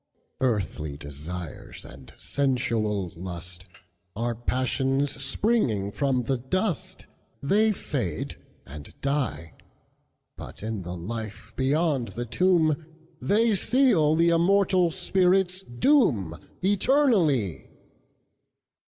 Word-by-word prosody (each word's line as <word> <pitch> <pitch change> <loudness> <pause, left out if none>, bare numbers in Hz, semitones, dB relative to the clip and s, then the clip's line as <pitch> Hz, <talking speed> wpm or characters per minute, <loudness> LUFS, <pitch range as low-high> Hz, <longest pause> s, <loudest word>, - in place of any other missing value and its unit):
Earthly 85 - -1
desires 75 +4 -7
and 65 +1 -13
sensual 115 -8 -1
lustAre 90 +5 -7
passions 135 +2 +1
springing 135 - +1
from 130 +1 0
the 130 +3 0
dust, 180 - -2 0.4
They 215 +9 +3
fade 120 - -3 0.3
and 75 +1 -11
die; 140 - -2 0.8
But, - - -10
in 110 -2 -3
the 90 0 -6
life 110 +3 -7
beyond 140 -1 +1
the 120 - -4
tomb, 160 +2 +2 0.4
They 220 +3 +3
seal 200 - +3
the 170 +1 +4
immortal 180 +1 +3
spirit's 185 +1 +1
doomEternally! 170 - +1
130 Hz, 85 wpm, -26 LUFS, -, 0.8 s, the